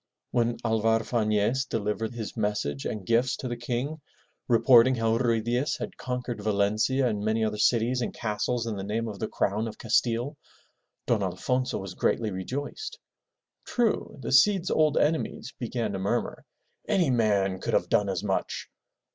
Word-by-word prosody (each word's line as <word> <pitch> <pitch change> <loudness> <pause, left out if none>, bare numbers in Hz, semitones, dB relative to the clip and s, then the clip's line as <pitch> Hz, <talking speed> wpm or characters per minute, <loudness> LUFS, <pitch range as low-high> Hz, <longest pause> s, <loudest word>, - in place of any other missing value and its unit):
When 120 -1 +1
Alvar 115 0 +2
Fanez 110 +2 +1
delivered 110 +1 -2
his 110 -3 -5
message 105 - -2
and 105 -4 -5
gifts 120 +4 +2
to 130 - -5
the 120 - -3
King 125 +6 -3 0.5
reporting 120 +1 +6
how 115 -1 +1
Ruy 115 -3 +2
Diaz 120 +5 0
had - - -5
conquered 125 -3 -4
Valencia 110 +6 +1
and 105 -3 -2
many 110 +1 +1
other 105 -1 -2
cities 120 +3 +2
and 115 - -2
castles 115 +2 -2
in 110 -3 -3
the 95 - -4
name 110 +3 -2
of 105 -3 -6
the 110 - -2
crown 105 +3 -1
of 110 - -7
Castile, 120 +4 +1 0.7
Don - - +1
Alfonso 125 0 -1
was 95 -2 -6
greatly 110 +3 0
rejoiced. 140 - -5 0.7
True, 235 -3 0
the - - -5
Cid's 185 +7 +4
old 155 -1 +3
enemies 155 +1 0
began 120 -2 -2
to 95 - -3
murmur, 95 +1 -2 0.4
*'Any 175 -8 +2
man 100 -5 +2
could - - -1
have - - +2
done 100 -1 +2
as 95 0 -2
much!'' 95 -2 -2
115 Hz, 165 wpm, -27 LUFS, 105-125 Hz, 0.7 s, reporting